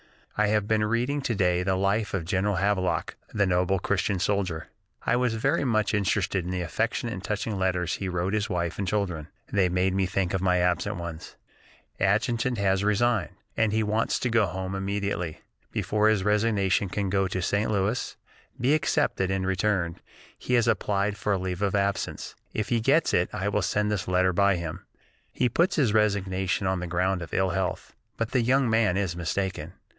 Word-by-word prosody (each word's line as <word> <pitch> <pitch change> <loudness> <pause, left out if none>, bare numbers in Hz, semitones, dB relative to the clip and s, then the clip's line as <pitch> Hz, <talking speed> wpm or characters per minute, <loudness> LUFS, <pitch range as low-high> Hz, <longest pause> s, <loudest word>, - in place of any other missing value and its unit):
I 105 0 +2
have 105 -1 +1
been 110 0 +2
reading 120 +6 0
to 120 -4 -1
day 90 -2 +2
the 95 +1 +1
life 100 +2 0
of 90 -4 -3
General 95 +3 0
Havelock, 95 -1 0 0.2
that 100 -2 +3
noble 90 +1 +2
Christian 100 +2 0
soldier. 95 -4 -1 0.4
I - - +3
was 125 -2 +1
very 140 +8 +1
much 110 -5 +1
interested 95 -2 +1
in 90 - -5
the 90 -1 -2
affectionate 115 +6 -1
and 95 - -7
touching 105 -1 -2
letters 90 -2 0
he 95 - -3
wrote 90 +2 -1
his 110 +1 0
wife 85 -2 -2
and 100 - -1
children; 90 -6 -1 0.3
they 95 -3 +3
made 90 +1 +1
me 95 -1 +1
think 95 -1 -1
of 95 - 0
my 90 -1 +3
absent 90 +3 +1
ones.... 85 -3 -7 0.6
"Adjutant 115 +5 +1
has 95 -1 +1
resigned, 105 0 +1 0.2
and 110 -2 +2
as - - -1
he 110 - +2
wants 110 +2 0
to 125 - -1
go 110 -3 +3
home 95 +3 -4
immediately, 95 -4 -3 0.3
before 105 0 +1
his 105 -3 +2
resignation 105 -2 +2
can 100 0 -2
go 95 -1 +2
to 95 - -3
St. 100 +4 0
Louis, 105 +3 -1 0.4
be 130 +5 +3
accepted, 145 -10 +1
and 95 -1 -1
returned, 95 -3 0 0.3
he 125 - -1
has 120 -1 +3
applied 100 -2 +1
for 105 - -1
a - - +1
leave 90 0 -4
of 100 -1 +1
absence. 100 0 -1 0.2
If 110 - -3
he 120 - +2
gets 140 +8 +2
it, 85 - +2
I 100 +2 -2
will 105 0 0
send 105 +3 0
this 95 -5 -2
letter 90 0 +2
by 100 +1 +3
him. 85 +2 -5 0.5
He 125 - +1
puts 170 - +2
his 125 -9 +2
resignation 100 -2 +1
on 95 0 0
the 90 - -4
ground 90 +2 0
of 85 - -6
ill 95 -1 +2
health, 95 0 -3 0.2
but 115 +1 -2
the 130 - +2
young 130 +2 +3
man 110 -5 +2
is 95 -4 -1
mistaken. 85 -1 -3
100 Hz, 195 wpm, -26 LUFS, 90-105 Hz, 0.6 s, that